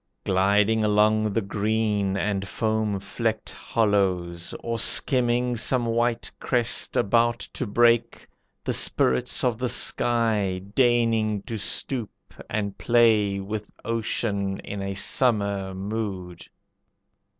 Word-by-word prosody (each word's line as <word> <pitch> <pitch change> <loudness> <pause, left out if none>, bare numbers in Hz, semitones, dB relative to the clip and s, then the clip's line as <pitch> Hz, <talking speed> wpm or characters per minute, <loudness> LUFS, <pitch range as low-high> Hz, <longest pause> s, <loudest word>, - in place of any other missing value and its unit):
Gliding 100 +3 +2
along 105 0 +2
the 115 - 0
green 105 -1 -1
and 100 -1 -2
foam 110 -2 -1
flecked 110 +2 -3
hollows, 95 -6 -1
Or 115 -1 -3
skimming 125 +1 +2
some 120 +2 +1
white 115 0 -1
crest 120 -2 +1
about 115 +3 +2 0.2
to 130 - -4
break, 115 +2 +2 0.4
The - - -1
spirits 65 0 +1
of 120 -3 0
the 125 -1 -1
sky 110 -8 0
deigning 115 -4 +2
to 115 -2 -5
stoop 115 +2 -2 0.4
And 100 -2 -3
play 110 -4 +3
with 105 +2 -5 0.2
ocean 105 -3 -2
in 100 -1 -6
a 100 0 -4
summer 100 -3 0
mood. 95 -3 -5
110 Hz, 110 wpm, -25 LUFS, 100-115 Hz, 0.4 s, play